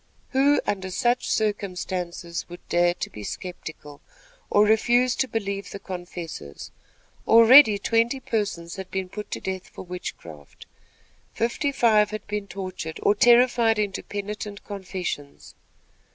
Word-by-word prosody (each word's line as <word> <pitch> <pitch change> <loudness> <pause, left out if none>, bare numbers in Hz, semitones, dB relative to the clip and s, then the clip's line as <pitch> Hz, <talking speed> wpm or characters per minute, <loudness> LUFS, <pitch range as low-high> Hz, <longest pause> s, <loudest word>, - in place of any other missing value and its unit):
'" - - -37
Who, 280 +2 +3
under 190 -2 -2
such 240 +6 0
circumstances, 180 -5 -3
would 175 +1 -12
dare 175 0 +3
to - - -5
be 105 - -9
skeptical, 155 - -8 0.5
or 205 - +5
refuse 240 +4 +3
to 265 - +1
believe 200 -4 -3
the - - -7
confessors? 175 - -8 0.6
Already, 230 0 +8
twenty 230 +5 +1
persons 205 -9 -3
had 190 -1 -7
been 190 -1 -3
put 210 +2 -7
to - - -4
death 190 -1 -5
for - - -10
witchcraft. 85 - -9 0.7
Fifty 240 +5 0
five 220 -6 +4
had 215 0 -6
been 205 -1 -4
tortured 185 -5 -6
or - - +5
terrified 235 0 +4
into 205 -2 -1
penitent 205 0 -6
confessions. 185 -7 -6
200 Hz, 135 wpm, -25 LUFS, 180-225 Hz, 0.7 s, Already